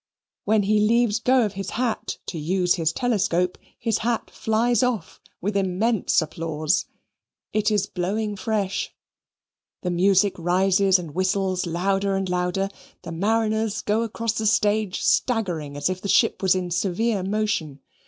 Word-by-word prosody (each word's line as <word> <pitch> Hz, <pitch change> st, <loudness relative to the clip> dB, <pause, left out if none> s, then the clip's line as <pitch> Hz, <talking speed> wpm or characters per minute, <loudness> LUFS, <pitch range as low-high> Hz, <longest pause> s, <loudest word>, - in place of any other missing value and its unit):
When 215 Hz, -1 st, +3 dB
he 210 Hz, +2 st, +2 dB
leaves 230 Hz, +1 st, +3 dB
go 250 Hz, 0 st, +3 dB
of 205 Hz, -, -4 dB
his 195 Hz, 0 st, -5 dB
hat 240 Hz, -2 st, -2 dB
to 165 Hz, -, -5 dB
use 180 Hz, +3 st, +1 dB
his 165 Hz, -2 st, 0 dB
telescope, 180 Hz, -6 st, 0 dB, 0.2 s
his 225 Hz, -2 st, -1 dB
hat 235 Hz, +1 st, -2 dB
flies 225 Hz, +1 st, +1 dB
off, 245 Hz, -9 st, -2 dB, 0.2 s
with 205 Hz, +3 st, -2 dB
immense 195 Hz, 0 st, +1 dB
applause. 155 Hz, +1 st, -1 dB, 0.7 s
It 215 Hz, 0 st, +2 dB
is 205 Hz, -2 st, +1 dB
blowing 205 Hz, +3 st, -2 dB
fresh. 200 Hz, -1 st, -2 dB, 0.9 s
The 180 Hz, -, -1 dB
music 190 Hz, +2 st, +3 dB
rises 190 Hz, +2 st, +3 dB
and 170 Hz, -5 st, -7 dB
whistles 185 Hz, 0 st, 0 dB
louder 195 Hz, +3 st, 0 dB
and 195 Hz, 0 st, -1 dB
louder; 180 Hz, +2 st, -1 dB, 0.3 s
the -, -, -7 dB
mariners 220 Hz, +4 st, 0 dB
go 210 Hz, +2 st, +1 dB
across 230 Hz, 0 st, -2 dB
the 220 Hz, -1 st, -1 dB
stage 210 Hz, -2 st, +1 dB
staggering, 175 Hz, -, 0 dB
as 145 Hz, -, 0 dB
if 185 Hz, 0 st, -3 dB
the 200 Hz, -, -4 dB
ship -, -, +3 dB
was 190 Hz, -1 st, +3 dB
in 180 Hz, -1 st, -3 dB
severe 195 Hz, +4 st, 0 dB
motion. 195 Hz, -7 st, -2 dB
195 Hz, 150 wpm, -24 LUFS, 180-220 Hz, 0.9 s, When